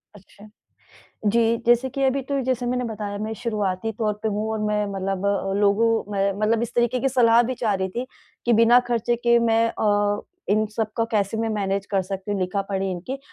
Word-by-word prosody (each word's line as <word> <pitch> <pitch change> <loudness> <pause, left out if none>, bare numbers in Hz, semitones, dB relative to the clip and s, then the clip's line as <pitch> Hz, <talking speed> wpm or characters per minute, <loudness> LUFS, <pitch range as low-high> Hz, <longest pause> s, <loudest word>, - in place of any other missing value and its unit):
अच्छा। 205 +1 -16 0.8
जी, 230 +2 +3
जैसे 240 +2 +4
कि 275 +1 -3
अभी 265 +1 +2
तो 275 +1 -2
जैसे 250 -1 -1
मैंने 250 0 -1
बताया 210 -3 -5
मैं 215 +1 -3
शुरुआती 210 -2 -1
तौर 215 -2 +1
पे 220 - 0
हूँ 215 +1 -2
और 220 - -2
मैं 210 0 0
मतलब 195 0 -3 0.4
लोगों 205 +3 +3 0.2
में 195 0 +1
मतलब 225 +2 +2
इस 235 - -4
तरीके 240 +1 +1
की 270 - +1
सलाह 240 -2 +5
भी - - -1
चाह 210 -2 +2
रही 190 0 -1
थी, 240 +7 -4 0.4
कि 240 - +2
बिना 230 +2 +6
ख़र्चे 240 0 0
के 235 0 +3
मैं 230 0 +3
अ, 205 -1 +1 0.3
इन 215 +1 +3
सब 220 -1 -1
का 230 - +2
कैसे 210 0 0
मैं 225 0 -1
मैनेज़ 200 -2 -1
कर 195 -2 +1
सकती 195 +2 -6
हूँ 200 - -1
लिखा 185 +2 -1
पढ़ी 195 -1 -1
इनकी? 185 +10 -5
220 Hz, 205 wpm, -23 LUFS, 200-235 Hz, 0.8 s, बिना